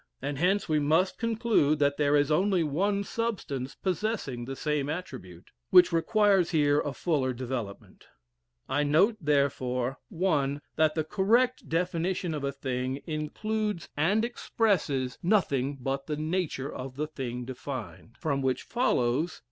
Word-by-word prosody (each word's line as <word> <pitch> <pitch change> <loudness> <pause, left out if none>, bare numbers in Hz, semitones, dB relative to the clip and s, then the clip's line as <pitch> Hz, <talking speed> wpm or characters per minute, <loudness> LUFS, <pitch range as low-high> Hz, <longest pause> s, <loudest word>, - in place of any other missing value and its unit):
And 140 0 -4
hence 190 +4 +2
we 155 -2 +2
must 160 +6 +2
conclude 225 -10 +2
that 145 -1 +2
there 145 -1 +3
is 145 +1 +3
only 185 +2 +3
one 200 +7 0
substance 185 - -3
possessing 185 - -2
the 135 +2 -5
same 150 -1 -1
attribute, 95 - -7 0.2
which 180 0 +7
requires 195 +1 +3
here 145 -3 +3
a 145 - -2
fuller 140 -4 0
development. 120 -5 -6 0.6
I 140 +2 +1
note 170 +10 +3
therefore 135 -3 0
1. 150 -7 0 0.2
That 155 -1 +2
the 160 - +1
correct 225 +9 +1
definition 175 +1 -1
of 150 -2 -4
a 140 - 0
thing 130 0 -3
includes 210 +5 -3
and 195 +10 +2
expresses 170 - 0
nothing 145 -8 +1
but 135 +2 -3
the 150 -1 -2
nature 155 -3 -2
of 130 0 -7
the 150 +3 -1
thing 125 -5 -5
defined. 130 -2 -7
From 140 -4 -1
which 130 -1 0
follows 160 - +1
2. - - -15
150 Hz, 145 wpm, -28 LUFS, 135-185 Hz, 0.6 s, which